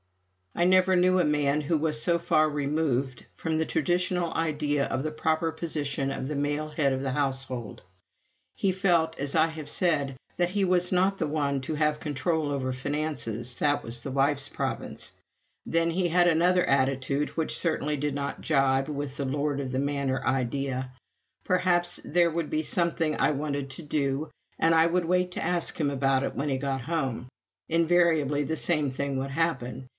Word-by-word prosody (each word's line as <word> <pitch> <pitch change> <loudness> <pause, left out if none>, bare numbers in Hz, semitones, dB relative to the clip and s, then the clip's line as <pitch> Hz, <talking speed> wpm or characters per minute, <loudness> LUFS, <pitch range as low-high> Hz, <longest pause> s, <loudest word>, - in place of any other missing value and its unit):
I 175 - +2
never 185 0 +5
knew 185 +1 +4
a - - +4
man 150 -1 +1
who 155 +2 +1
was 155 0 -1
so 170 0 +2
far 155 -2 +3
removed 140 -3 -1
from 160 -1 -2
the 160 - +1
traditional 175 +2 0
ideas 150 -3 0
of - - -1
the 155 - -2
proper 160 +1 0
position 145 -5 -3
of 130 -1 -4
the 150 - -3
male 145 +2 -1
head 150 -2 +1
of 130 0 -2
a 135 - -1
household. 130 -5 -3 0.7
He 195 - +1
felt, 175 -4 +1
as 140 0 -1
I 160 0 +5
have 160 -2 -7
said, 145 -6 0 0.2
that 175 0 +2
he 195 +1 +1
was 180 -1 +2
not 190 +2 +2
the 160 - 0
one 145 -2 -1
to 155 +4 -3
have 150 0 +1
control 150 +1 -1
over 130 -2 -2
finances 130 -4 -3
that 145 -1 +1
was 120 +1 -4
the 135 - -5
wife's 140 +1 +1
province. - - -4 0.5
Then 165 0 +1
he 175 +1 +1
had 175 +1 +4
another 175 +2 +3
attitude 135 +1 +1
which 160 - 0
certainly 150 -3 0
did 145 0 -2
not 140 0 -4
jibe 135 -2 +2
with 145 -2 -4
the 140 - -2
Lord 145 +1 -1
of 130 -2 -4
the 130 - -1
Manor 140 -1 -1
idea. 130 0 -1 0.5
Perhaps 175 -1 +1
there 170 +1 +2
would 165 -1 -2
be 155 0 0
something 165 -2 0
I - - +3
wanted 140 -1 -3
to 150 +6 -7
do, 145 0 -1 0.3
and 165 0 +4
I 160 +1 +5
would 175 0 +1
wait 180 +1 +1
to - - -3
ask 175 -2 0
him 150 -3 +2
about 135 -1 +1
it - - -3
when 145 +2 -1
he 135 - 0
got 135 -1 -2
home. 135 -4 -3 0.4
Invariably 165 -3 +3
the 160 +3 -2
same 150 -5 +1
thing 140 +1 -2
would 135 +1 -3
happen. 135 -5 -2
150 Hz, 185 wpm, -27 LUFS, 135-165 Hz, 0.7 s, never